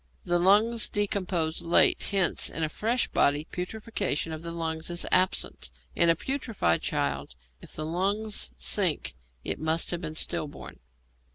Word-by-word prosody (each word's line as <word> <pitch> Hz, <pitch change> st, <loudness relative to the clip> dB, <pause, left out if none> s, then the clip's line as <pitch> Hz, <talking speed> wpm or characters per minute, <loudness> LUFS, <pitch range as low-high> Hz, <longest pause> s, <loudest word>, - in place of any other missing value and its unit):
The 175 Hz, -1 st, +1 dB
lungs 210 Hz, +5 st, +3 dB
decompose 185 Hz, -6 st, -1 dB
late, 170 Hz, 0 st, +4 dB
hence 195 Hz, -3 st, +3 dB
in 165 Hz, -, -4 dB
a 155 Hz, -, 0 dB
fresh 230 Hz, +9 st, 0 dB
body 145 Hz, +1 st, +2 dB
putrefaction 180 Hz, -4 st, -2 dB
of 155 Hz, -, -6 dB
the 170 Hz, -, -6 dB
lungs 160 Hz, -1 st, -4 dB
is 175 Hz, 0 st, -1 dB
absent; 185 Hz, -, +1 dB, 0.3 s
in 170 Hz, -, +4 dB
a 165 Hz, -, +5 dB
putrefied 230 Hz, -, -1 dB
child, 70 Hz, -2 st, -2 dB, 0.3 s
if -, -, -10 dB
the 155 Hz, -, -5 dB
lungs 200 Hz, -, -1 dB
sink, 65 Hz, -, +2 dB, 0.3 s
it -, -, -3 dB
must 160 Hz, +1 st, 0 dB
have 175 Hz, -1 st, -3 dB
been 155 Hz, -2 st, -5 dB
stillborn. 150 Hz, -1 st, -3 dB
175 Hz, 150 wpm, -27 LUFS, 160-200 Hz, 0.3 s, a